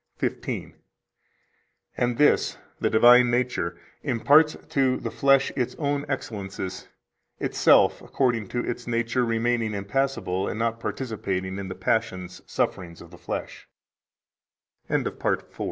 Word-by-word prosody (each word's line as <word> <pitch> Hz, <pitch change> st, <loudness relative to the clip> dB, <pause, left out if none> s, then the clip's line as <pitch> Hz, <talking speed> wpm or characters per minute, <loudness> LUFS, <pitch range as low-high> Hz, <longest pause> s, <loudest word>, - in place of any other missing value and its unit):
15: -, -, -3 dB, 1.2 s
"And 120 Hz, -1 st, 0 dB
this 150 Hz, -, +3 dB, 0.2 s
(the -, -, +1 dB
divine 120 Hz, +2 st, +7 dB
nature) 120 Hz, -8 st, -1 dB, 0.2 s
imparts 145 Hz, +6 st, +4 dB
to 130 Hz, -2 st, +2 dB
the -, -, -5 dB
flesh 135 Hz, 0 st, +3 dB
its 125 Hz, -1 st, -1 dB
own 145 Hz, -1 st, -2 dB
excellences, 100 Hz, -7 st, -5 dB, 0.5 s
itself -, -, +4 dB
[according 120 Hz, -6 st, 0 dB
to 120 Hz, +4 st, -3 dB
its 120 Hz, -, -4 dB
nature] 120 Hz, +1 st, 0 dB
remaining 115 Hz, -1 st, 0 dB
impassible 100 Hz, -3 st, -1 dB
and -, -, -3 dB
not 115 Hz, 0 st, -1 dB
participating 100 Hz, -7 st, -3 dB
in 100 Hz, -, -5 dB
the 95 Hz, -, -6 dB
passions 95 Hz, -2 st, -2 dB
[sufferings] 85 Hz, -2 st, -4 dB
115 Hz, 105 wpm, -25 LUFS, 100-130 Hz, 1.2 s, divine